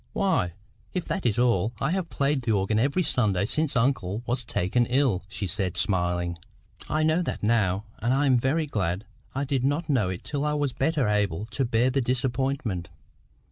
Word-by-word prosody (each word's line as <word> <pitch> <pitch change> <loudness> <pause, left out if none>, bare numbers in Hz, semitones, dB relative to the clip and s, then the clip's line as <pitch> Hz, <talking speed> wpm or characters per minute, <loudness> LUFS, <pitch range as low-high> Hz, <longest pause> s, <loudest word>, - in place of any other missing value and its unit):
"Why, 185 - +1 0.4
if 180 - -2
that 190 - -1
is 110 - 0
all, 115 -3 +2
I 140 +4 0
have 185 -2 -1
played 140 0 0
the 115 -2 0
organ 100 +2 +1
every 140 +9 +2
Sunday 105 - +2
since 155 +5 0
uncle 115 -4 0
was 120 +1 0
taken 115 +3 0
ill," 125 -7 +2
she 105 -1 -3
said, 90 0 -2
smiling. 90 -2 0 0.5
"I 155 0 +1
know 160 +3 +3
that 170 - -4
now. 105 -3 +2
And 115 +3 0
I 135 +2 +3
am 130 -3 +4
very 145 +6 +1
glad 100 - -2 0.3
I 140 - 0
did 135 -2 -1
not 145 +4 0
know 120 -10 +2
it 90 -1 -5
till 145 -1 -3
I 150 0 +1
was 145 -3 0
better 155 -7 +1
able 105 -2 0
to 135 - 0
bear 120 +2 +2
the 135 +1 +1
disappointment. 125 -7 -1
120 Hz, 190 wpm, -26 LUFS, 100-140 Hz, 0.5 s, am